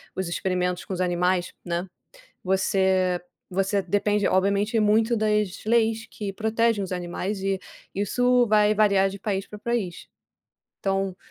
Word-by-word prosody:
os 190 -1 -2
experimentos 180 0 -1
com - - -5
os 185 - -2
animais, 180 0 +1
né, 175 +1 -2 0.6
você 190 -1 +2 0.3
você 195 +2 0
depende 205 +2 +1
obviamente 200 +4 +2
muito 220 +2 +3
das 210 -3 0
leis 225 0 +2
que 205 -2 -5
protegem 220 0 +1
os 190 - -6
animais 180 +3 -3
e, 195 0 0 0.4
isso 245 +5 +2
vai 210 0 +4
variar 200 -2 +4
de 200 +1 -8
país 195 -1 -2
pra 210 - -9
país, 210 -5 -3 0.7
então 195 -1 -1
195 Hz, 140 wpm, -25 LUFS, 185-215 Hz, 0.7 s, vai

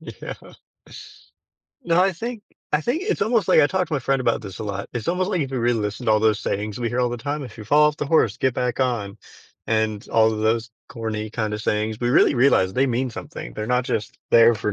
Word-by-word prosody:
Yeah. - - -8 1.5
No, 170 -4 +2
I 190 +1 +3
think 225 +4 -6 0.3
I 150 - +3
think 250 - -1
it's 420 - -1
almost 220 +1 +1
like - - +6
I 145 - +5
talked 185 +3 -1
to 160 - -2
my - - +1
friend 135 +1 0
about 115 -3 0
this 95 -3 -8
a 110 - -5
lot, 100 -1 -4
It's 120 -3 -4
almost 185 +3 0
like 185 - 0
if 135 -3 -2
you 130 - -2
really 120 -1 +1
listen 105 +3 -4
to 110 - +4
all 110 - +3
those 110 -1 +3
sayings 105 0 -3
we 120 -1 -1
hear 120 +2 -1
all 125 - +2
the 120 - -4
time, 145 +4 -4
"If 120 -4 -10
you 105 - -8
fall 150 +7 +5
off 150 - -4
the 150 - -3
horse, 140 -9 +2
get 130 -2 0
back 125 +1 -1
on", 115 -6 -1 0.5
and 110 -1 -1
all 110 0 +3
of 110 - -4
those 115 +2 0 0.2
corny 110 -2 -4
kind 110 -2 -2
of 105 - -5
sayings, 110 0 -1
we 120 - 0
really 140 - +4
realize 120 -7 +3
they 135 +5 +2
mean 125 0 -1
something. - - -8
They're 105 - -4
not 125 +1 +1
just 110 - -3
there 115 0 +6
for 105 -1 -2
120 Hz, 255 wpm, -22 LUFS, 110-145 Hz, 1.5 s, like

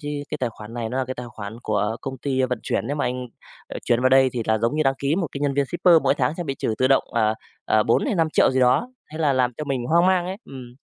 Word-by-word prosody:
chứ, 145 - -6 0.2
cái - - -4
tài 125 -2 -1
khoản 110 +1 -11
này 115 -2 -3
nó 125 +3 -3
là 130 - 0
cái 130 +1 -5
tài 125 - -7
khoản 110 -1 -8
của 105 +1 -1
công 135 -1 -6
ty 130 -1 -1
vận 125 -2 -1
chuyển, 105 - -2
nếu 145 +2 -2
mà - - -1
anh, 125 0 -3 0.4
ờ, - - -6
chuyển 120 0 +2
vào 130 - +4
đây 130 0 +5
thì 120 -2 -2
là 110 0 +2
giống 115 +6 0
như 155 - +2
đăng 135 -2 +2
ký 140 +3 0
một 180 -3 0
cái 140 - -6
nhân 140 -1 0
viên 140 0 +2
shipper, 175 +3 +3
mỗi - - +3
tháng 130 +3 0
sẽ 175 - -4
bị 135 -3 -3
trừ 110 -4 -2
tự 130 - +3
động, 135 - +3
à, 110 -1 +2 0.3
ờ, 110 - +3
bốn 115 - +2
hay 240 - 0
5.000.000 160 -3 +3
gì 130 0 +1
đó", 130 - +3 0.2
thế 155 - -7
là 150 -3 +2
làm 125 -1 +1
cho 150 - -4
mình 135 -4 -2
hoang 170 +4 +4
mang 185 -2 +2
ấy, 190 +1 -4
ừm. 125 -2 -11
130 Hz, 310 wpm, -23 LUFS, 120-145 Hz, 0.4 s, đây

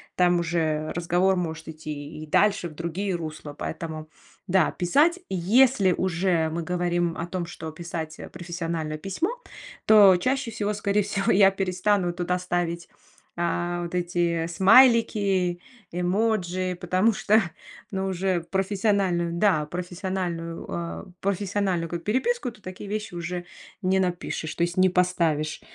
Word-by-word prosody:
там 175 -1 +3
уже 160 -2 -1
разговор 175 +2 +2
может 160 -2 -4
идти 155 -1 -7
и - - -10
дальше 200 +1 +2
в 155 - -14
другие 175 +4 -2
русла. 155 -3 -6
Поэтому 155 0 -6 0.4
да, 190 0 +3
писать. 295 - +2
Если 195 +2 +4
уже 175 -2 +1
мы 165 +1 -3
говорим 175 -1 0
о 170 - -4
том, 175 -1 -3
что 160 -2 -7
писать, 165 -1 -6
э, - - -8
профессиональное 170 -3 -4
письмо, 195 - -2 0.6
то 200 -4 +8
чаще 255 +5 -1
всего, 210 -1 -2
скорей 205 0 +1
всего, 195 0 0
я 195 0 +6
перестану 190 -1 0
туда 180 0 -1
ставить, 175 -1 -2 0.5
а, 175 0 -1
вот 170 +1 -5
эти 175 -2 0
смайлики, 195 -2 +4 0.3
эмоджи, 185 -1 0
потому 185 +5 +2
что, 215 +3 +3 0.5
ну, 190 0 -2
уже 185 -1 0
в 170 - -21
профессиональную, 190 -3 +1
да, 170 -4 +2
профессиональную, 175 0 -4
э, 170 -1 -5 0.2
профессиональную 195 -3 -1
ка 170 - -2
переписку, 260 - 0
то 215 - -19
такие 185 +2 -8
вещи 210 -2 -4
уже 175 +1 -4 0.4
не 190 0 +2
напишешь, 175 -3 -2
то - - -4
есть 175 0 -1
не 185 0 +5
поставишь, 170 -4 0
180 Hz, 140 wpm, -25 LUFS, 170-195 Hz, 0.6 s, то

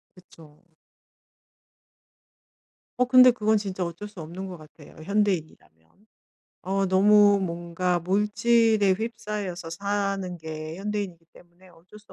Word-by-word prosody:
그쵸. 165 -4 -19 2.4
어 250 - +4
근데 255 0 +7
그건 220 -3 +1
진짜 190 -3 -4
어쩔 170 +5 -7
수 205 -3 -14
없는 180 +5 -7
것 180 - -8
같아요 155 -1 -16
현대인이라면. 175 - -2 0.8
어 195 +1 -1
너무 205 +2 +5
뭔가 175 0 -2
물질에 210 +2 +2
휩싸여서 205 -5 -5
사는 195 -1 -3
게 155 0 -7
현대인이기 195 -4 -5
때문에 175 +2 -20
어쩔 175 +4 -17
수 210 - -19
190 Hz, 250 characters per minute, -25 LUFS, 170-210 Hz, 2.4 s, 근데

